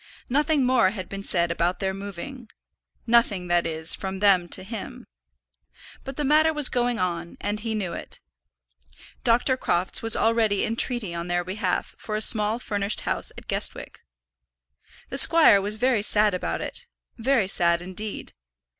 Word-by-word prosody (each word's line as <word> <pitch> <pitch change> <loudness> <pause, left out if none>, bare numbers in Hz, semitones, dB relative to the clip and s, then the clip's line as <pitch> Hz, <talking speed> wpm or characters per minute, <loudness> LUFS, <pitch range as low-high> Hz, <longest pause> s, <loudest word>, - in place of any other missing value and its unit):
Nothing 290 +1 +1
more 250 -6 +3
had 190 -3 -7
been 195 0 -7
said 170 -4 0
about 170 +2 -1
their 190 -1 -2
moving, 200 +6 -9 0.6
nothing, 220 -6 +1
that 175 -1 +1
is, 160 0 -1
from 190 0 -5
them 190 -4 +3
to - - -3
him. 215 +1 -8 1.0
But 270 0 -8
the 295 - -2
matter 310 +3 +3
was 300 -3 +7
going 245 -1 -1
on, 170 -3 -4
and 205 +1 -3
he 220 0 -4
knew 190 -5 -4
it. - - -6 1.0
Dr. 245 +3 +2
Crofts 180 -6 -1
was 225 0 +5
already 225 -3 +1
in 225 - -3
treaty 230 -7 +1
on 170 0 -5
their 175 0 -1
behalf 185 0 -3
for 215 - -5
a 215 - -2
small 215 0 +2
furnished 205 -3 -1
house - - -2
at - - -12
Guestwick. - - -3 1.1
The 270 - +3
squire 305 -11 +6
was 205 +2 -1
very 245 -1 +1
sad 210 0 +5
about 180 - -3
it, - - -7 0.3
very 235 -4 +1
sad 170 -2 +3
indeed. 185 +4 -7
210 Hz, 165 wpm, -24 LUFS, 185-240 Hz, 1.1 s, was